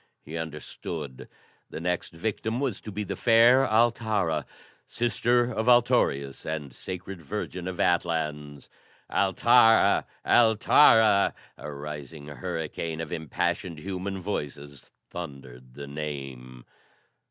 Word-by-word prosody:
He 80 - -9
understood. 75 -3 -6 0.4
The - - -6
next 90 +1 -2
victim 110 +6 -3
was 135 -7 -2
to 105 - -8
be 105 +1 -3
the 100 -1 -4
fair 120 +5 +5
Altara, 110 - +1 0.4
sister 120 +1 +1
of 110 +2 0
Altorius 120 - +2
and 75 -4 -5
Sacred 90 +4 -7
Virgin 90 +4 -5
of 95 -1 -5
Atlans. 75 -4 -1 0.4
"Altara! 115 0 +4 0.2
Altara!" 110 -2 +5 0.2
A 75 - -8
rising 75 +1 -8
hurricane 80 0 -4
of 80 0 -5
impassioned 85 +2 -2
human 95 +3 -5
voices 75 -7 -6 0.2
thundered 65 -7 -9
the 70 - -7
name. 70 -4 -7
85 Hz, 110 wpm, -27 LUFS, 75-105 Hz, 0.4 s, fair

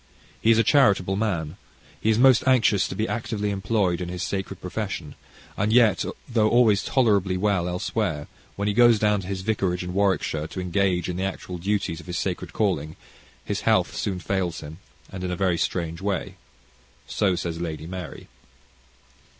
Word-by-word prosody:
He 110 - +2
is 115 - +6
a 115 - +4
charitable 100 -10 +3
man. 95 -6 -2 0.4
He 110 - +1
is 110 - +3
most 130 -1 +6
anxious 115 -6 +4
to - - -6
be 110 +1 -1
actively 105 -3 -2
employed 95 -3 0
in 90 - -4
his 90 0 -4
sacred 95 -1 -4
profession, 90 -5 -5 0.4
and 105 +2 0
yet 115 -4 +4 0.2
though 110 -3 +2
always 115 -4 +4
tolerably 100 -7 +2
well 95 -3 +1
elsewhere, 90 -4 -2 0.3
when 100 +1 -2
he 105 - +1
goes 120 0 +6
down 105 -1 +2
to 90 - -9
his 95 -1 -3
vicarage 95 -4 -1
in 90 0 -5
Warwickshire, 95 -6 0
to 95 - -7
engage 90 0 0
in 90 -1 -3
the 95 - -2
actual 95 -2 -4
duties 95 -3 -1
of 85 - -13
his 90 - -3
sacred 90 -2 -3
calling, 80 -7 -1 0.5
his - - -2
health - - +2
soon 95 -2 -2
fails 90 -2 -2
him, 80 +3 -9 0.3
and 95 -1 -6
in 90 - -2
a 90 - -2
very 90 -2 +1
strange 85 -1 -2
way. 100 -3 -2 0.7
So 95 -3 +1
says 85 -1 -4
Lady 80 -2 -4
Mary. 90 +1 -7
95 Hz, 180 wpm, -24 LUFS, 90-105 Hz, 0.7 s, is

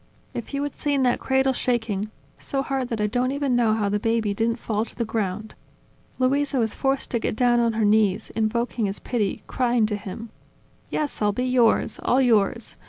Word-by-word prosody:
"If 235 - -6
you 280 - -1
had 290 - -5
seen 285 -2 +1
that 245 -1 +2
cradle 265 0 +2
shaking, 225 -5 -1 0.3
so 270 -1 -2
hard 270 -2 -2
that 230 - -3
I 210 - +2
don't 245 +4 0
even 280 -2 0
know 230 -3 +3
how 210 -2 0
the 205 +1 0
baby 225 -1 0
didn't 230 +3 0
fall 220 -2 -2
to - - -11
the 235 - -1
ground! 215 -1 -3 0.6
Luisa 275 +2 +1
was 225 -3 +1
forced 270 0 -1
to 235 - +1
get 220 - -2
down 240 0 +3
on 230 -1 +2
her 220 -1 +1
knees, 205 -2 +2
invoking 225 0 0
his 195 - -3
pity, 215 -6 -2
crying 240 -3 +1
to 210 -1 -1
him: 215 +2 -8 0.6
"Yes, 295 -6 -2
I'll 205 -1 +2
be 250 +4 -1
yours, 250 -3 +2
all 250 - +2
yours!.. 230 -3 +2
230 Hz, 200 wpm, -24 LUFS, 215-255 Hz, 0.6 s, know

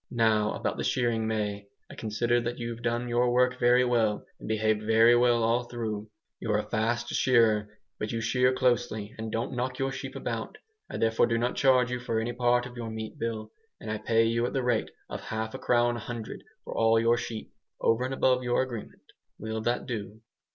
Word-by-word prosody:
Now 110 -3 +2
about - - -2
the - - -2
shearing, 115 -3 0
May. 105 -2 -2 0.2
I - - -11
consider 120 +2 0
that 120 +1 -3
you've 120 -1 -5
done 120 0 -1
your 120 +1 +2
work 125 +1 +2
very 125 +1 +5
well, 115 -4 +1
and - - -9
behaved 110 0 +1
very 115 +2 +5
well 120 -1 +3
all 120 +2 +2
through. 110 -3 -4 0.3
You're 105 -2 0
a 105 - -3
fast 120 +2 -1
shearer, 110 -4 +2 0.2
but 105 - -3
you 115 - -2
shear 125 +3 +2
closely, 120 -4 0
and 110 0 -4
don't 115 +4 -2
knock 130 +1 -2
your 135 0 -1
sheep 130 - -6
about. - - -4 0.3
I - - -5
therefore 115 0 +3
do 115 - +1
not 120 +2 0
charge 130 -2 +4
you 125 - -2
for 115 -2 -1
any 115 +2 -2
part 120 0 +2
of 125 0 -9
your 115 -1 -4
meat 110 0 -6
bill, 110 -2 -3 0.3
and 110 - -6
I 105 - -2
pay 115 +1 +3
you 115 +1 +1
at - - -6
the 135 - 0
rate 120 -3 +1 0.2
of - - -6
half 110 0 -3
a - - -6
crown 120 0 +2
a - - -5
hundred 115 -1 -7 0.2
for - - -7
all 115 0 +4
your 115 +1 +4
sheep, 115 -2 -5 0.3
over 115 +2 +2
and 130 - -2
above 130 -1 +3
your 125 +1 +1
agreement. 120 -5 -8 0.3
Will 110 +1 -4
that 120 +2 -1
do?" 110 -3 -6
115 Hz, 210 wpm, -28 LUFS, 110-120 Hz, 0.3 s, very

